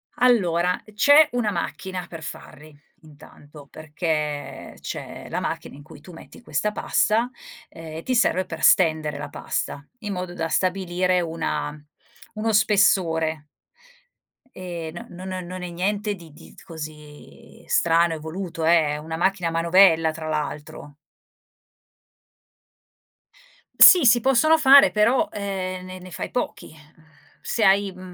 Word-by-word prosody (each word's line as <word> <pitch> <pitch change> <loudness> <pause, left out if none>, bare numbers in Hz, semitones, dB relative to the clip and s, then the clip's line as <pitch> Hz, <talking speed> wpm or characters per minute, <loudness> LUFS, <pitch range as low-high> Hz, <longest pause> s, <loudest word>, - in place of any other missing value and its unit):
Allora, 180 -8 +2
uhm, 215 - -17
c'è 285 +8 +5
una 240 -4 -1
macchina 185 +1 -5
per 165 -2 -10
farli, 155 0 -11 0.3
intanto, 145 -1 -16
perché 150 -2 -4
c'è - - -8
la - - -2
macchina - - -5
in 145 - -13
cui 155 -1 -15
tu 180 - -14
metti 165 - -14
questa 210 -3 -2
pasta, 225 +3 +1 0.4
ehm, 160 -1 -10
e 165 - -8
ti 255 - -2
serve 185 -6 +2
per 165 -3 -8
stendere 155 -4 +3
la 145 - -7
pasta 140 - -4 0.2
in 210 -3 -5
modo 180 -1 -5
da 165 -2 -3
stabilire 185 0 0
una 150 -3 -4 0.5
uno 220 +1 -2
spessore 165 -7 +2 1.1
ehm, 175 -2 -7
no 180 +1 -11
non - - -7
non 185 -1 -5
non 180 +1 -7
è 180 - -5
niente 205 +4 -2
di 165 -5 -15
di - - -16
t - - -17
così 150 -3 -12
strano, 170 0 +2
evoluto 160 +1 -6
eh, 165 -2 +4
è - - -5
una 160 +2 -6
macchina 180 +1 0
a - - -2
manovella 165 -1 +4
tra 160 0 -8
l'altro. 150 -1 -5 2.8
Sì, 355 -6 +9
si 240 0 +6
possono 270 +6 +3
fare 280 -2 +7
però, 240 +8 +2
ehm, 185 -2 -5
ne 185 0 -9
ne 185 0 -12
fai - - -5
pochi, 250 - -4
uhm, 155 0 -20 0.4
se 230 - -2
hai, 195 0 +3
m 185 - -15
175 Hz, 145 wpm, -23 LUFS, 160-200 Hz, 2.8 s, Sì